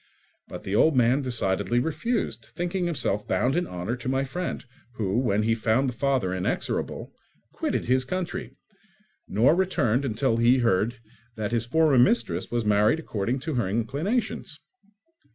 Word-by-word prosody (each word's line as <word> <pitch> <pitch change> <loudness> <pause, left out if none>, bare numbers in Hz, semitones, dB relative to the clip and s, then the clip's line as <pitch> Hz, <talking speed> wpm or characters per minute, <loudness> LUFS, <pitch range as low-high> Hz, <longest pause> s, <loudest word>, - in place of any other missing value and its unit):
But - - -8
the 95 - -4
old 155 +7 +4
man 125 +3 +3
decidedly 100 -4 0
refused, 155 - -1
thinking 175 +1 -1
himself 135 -11 -1
bound 130 +4 +1
in 175 +1 0
honour 90 +6 -3
to 125 +1 -4
my 135 +1 +1
friend, 170 +4 -4 0.3
who, 105 +1 0
when 105 -5 +1
he 115 +1 +2
found 115 +4 +1
the 125 - -2
father 130 -7 0
inexorable, 95 -1 -2 0.4
quitted - - -2
his 130 +1 +2
country, 185 +6 -4 0.7
nor 120 +9 +4
returned 140 - +1
until 115 -1 0
he 120 +2 +4
heard 115 -1 +1 0.4
that 110 -1 -3
his 115 -1 0
former 155 -1 +4
mistress 120 -2 +2
was 120 -2 -1
married 105 +7 +3
according 120 -2 -2
to 155 +2 -3
her 120 -7 0
inclinations. 140 - -2
120 Hz, 155 wpm, -26 LUFS, 110-145 Hz, 0.7 s, old